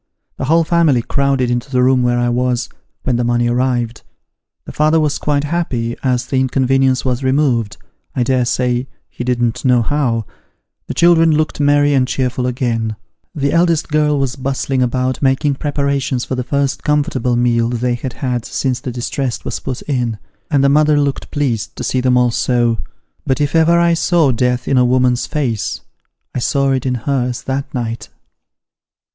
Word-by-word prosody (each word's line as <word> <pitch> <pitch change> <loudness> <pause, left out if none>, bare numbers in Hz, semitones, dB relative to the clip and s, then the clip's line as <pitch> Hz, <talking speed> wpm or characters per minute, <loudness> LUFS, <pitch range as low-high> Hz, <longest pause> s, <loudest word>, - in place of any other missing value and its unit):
The - - -3
whole 165 +4 +3
family 160 -7 +2
crowded 135 -2 0
into 120 +3 -2
the 125 -2 +1
room 130 0 +3
where 120 0 +1
I 120 0 +1
was, 125 0 0 0.3
when 125 -2 0
the 120 - 0
money 120 0 +1
arrived. 120 -1 -1 0.6
The - - -8
father 155 +2 +2
was 150 -2 0
quite 145 -1 0
happy 135 -8 -2
as 125 -2 0
the 130 0 -1
inconvenience 130 -1 +1
was 130 0 -1
removed 130 -5 +1 0.4
I 125 - +1
dare 125 0 +1
say 125 +1 0 0.3
ho - - -4
didn't 120 -2 -1
know 125 -2 +3
how; 120 -4 0 0.6
the - - -5
children 165 -1 +5
looked 155 0 -1
merry 145 0 +3
and 130 -2 +2
cheerful 125 -1 -1
again; 115 -4 -1 0.4
the 140 -2 0
eldest 170 -2 +2
girl 150 -1 +2
was 135 -2 -1
bustling 135 0 -2
about, 125 +1 -1
making 140 +1 +2
preparations 140 -2 -1
for - - -4
the 125 -1 -2
first 140 +1 -1
comfortable 145 -5 0
meal 120 -1 +2
they 120 +1 -1
had 120 +1 -4
had 125 -4 -2
since 130 0 -2
the 125 - -5
distress 125 +1 -3
was - - -3
put 130 -2 -5
in; 120 -6 -2 0.3
and 145 -4 +2
the - - +5
mother 150 +1 +4
looked 140 -1 -2
pleased 130 -7 -2
to - - -6
see 130 - 0
them 125 0 +3
all 125 -1 +3
so. 120 -1 +1 0.5
But 135 +1 +1
if 145 +1 0
ever 165 +1 +4
I 170 0 +3
saw 165 -4 +2
death 125 +1 0
in 135 - +3
a - - +5
woman's 125 0 +2
face, 130 -9 -2 0.5
I - - -2
saw 140 +2 +1
it 130 0 -1
in 125 - 0
hers 125 0 -2
that 140 +2 -3
night. 115 -2 -4
130 Hz, 180 wpm, -17 LUFS, 120-145 Hz, 0.6 s, children